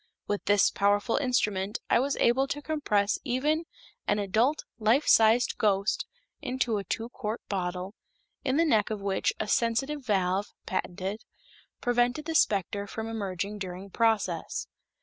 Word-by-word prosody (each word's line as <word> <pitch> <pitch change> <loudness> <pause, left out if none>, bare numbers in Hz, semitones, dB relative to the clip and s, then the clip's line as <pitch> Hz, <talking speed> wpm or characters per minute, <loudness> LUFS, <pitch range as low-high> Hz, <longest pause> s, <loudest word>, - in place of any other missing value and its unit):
With 205 -1 -3
this 205 -1 +4
powerful 205 +2 +2
instrument 210 -6 0
I - - +4
was 275 +3 0
able 260 +3 +3
to 285 - -3
compress 215 -10 +1
even 295 +5 0 0.4
an 205 - +2
adult 220 +9 +1
life 230 +7 +3
sized 225 +2 +5
ghost 200 -1 +1 0.3
into 250 -3 -1
a - - -5
two 230 +4 -3
quart 230 -2 -4
bottle, 185 0 -3 0.5
in 265 0 +1
the 335 - +4
neck 220 -9 +3
of 215 -1 -3
which 195 -1 +1
a 215 - -2
sensitive 265 +7 0
valve 195 -3 +1 0.2
(patented) 190 +3 -3 0.6
prevented 245 +4 +1
the 325 - -3
specter 200 - +1
from 220 +2 -5
emerging 205 -2 -3
during 190 +1 -6
process. 225 0 0
220 Hz, 145 wpm, -28 LUFS, 200-250 Hz, 0.6 s, sized